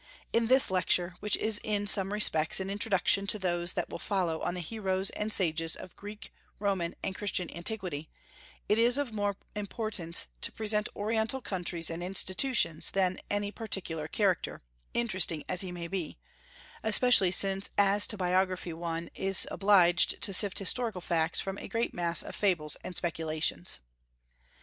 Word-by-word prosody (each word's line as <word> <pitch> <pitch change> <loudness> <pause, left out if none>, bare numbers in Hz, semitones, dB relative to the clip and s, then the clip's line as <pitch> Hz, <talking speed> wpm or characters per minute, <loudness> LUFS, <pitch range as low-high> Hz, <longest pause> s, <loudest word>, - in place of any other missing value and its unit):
In 230 0 +2
this 260 -3 +5
lecture, 180 -1 +2
which 210 - +1
is 215 -1 -1
in 205 -1 -1
some 195 -1 +1
respects 160 -7 +4
an 190 +1 -3
introduction 200 -1 +2
to 215 - +2
those 175 -2 -1
that - - -2
will - - -7
follow 175 -5 -1
on 175 - -2
the - - -3
heroes 190 +1 0
and 210 +1 -3
sages 165 -4 +1
of 180 - -11
Greek, 210 +1 -10 0.2
Roman, 190 -4 -1
and 190 - -2
Christian 190 -5 -2
antiquity, 170 -5 -4 0.6
it 210 - +2
is 240 +3 +4
of 285 -6 -2
more 205 -2 -1 0.2
importance 205 -4 -1 0.2
to - - 0
present 210 -1 -1
Oriental 220 +4 -1
countries 175 -7 -3
and 165 +1 -5
institutions 185 - +1
than 185 -1 0
any 205 0 -1
particular 180 -9 -4
character, 195 -1 -1 0.3
interesting 185 -9 +1
as 180 - -1
he 185 -2 -4
may 175 -1 -6
be, 175 - -4 0.6
especially 220 -3 +5
since 195 +2 0
as 205 0 +4
to 215 - -3
biography 185 -1 0
one 165 0 -4
is 195 0 +2
obliged 190 -3 +4
to 195 - 0
sift 195 +1 +3
historical 220 -1 +1
facts 165 -1 +2
from 195 0 -3
a - - -7
great 230 0 -1
mass 170 -1 +1
of - - -8
fables 170 -7 +1
and 180 - -7
speculations. 160 - -1
190 Hz, 160 wpm, -30 LUFS, 175-210 Hz, 0.6 s, this